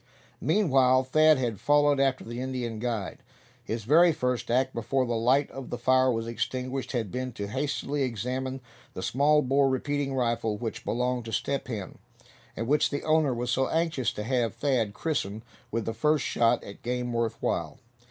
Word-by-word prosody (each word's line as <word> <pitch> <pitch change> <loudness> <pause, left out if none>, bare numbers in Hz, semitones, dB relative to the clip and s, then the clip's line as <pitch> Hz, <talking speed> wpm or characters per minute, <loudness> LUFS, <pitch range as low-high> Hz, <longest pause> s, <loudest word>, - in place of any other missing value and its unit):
Meanwhile 135 -7 +3
Thad 155 +3 +5
had 120 -6 -2
followed 145 -1 +3
after 135 -1 +1
the 120 +2 -6
Indian 125 -4 -3
guide. 115 -5 -3 0.4
His 110 0 -4
very 165 +9 +6
first 125 -4 -2
act, 130 +2 +1
before 125 +3 0
the 120 - -2
light 125 +5 +2
of 135 -2 -8
the 120 - -3
fire 130 +1 +3
was 115 -1 -2
extinguished, 125 +4 -3
had 110 -6 -2
been 130 0 -3
to 100 - -4
hastily 140 +4 -2
examine 130 +2 -2 0.3
the 95 - -5
small 150 +3 +3
bore 135 +1 +3
repeating 135 +1 -1
rifle 115 -4 0
which 115 0 -5
belonged 125 0 -1
to 115 - -6
Step 140 +5 -2
Hen, 105 -7 -6 0.6
and 115 - -2
which 150 +5 +2
the 145 - -3
owner 155 -3 +3
was 120 0 -2
so 130 +1 +1
anxious 160 -7 0
to 105 - -5
have 120 -1 0
Thad 120 -7 0
christen 110 -9 -2 0.3
with 115 0 -2
the 115 - -2
first 150 +6 +1
shot, 115 0 +2
at 100 - -11
game 125 0 -2
worth 115 -1 -1
while. - - -2
125 Hz, 180 wpm, -27 LUFS, 115-135 Hz, 0.6 s, very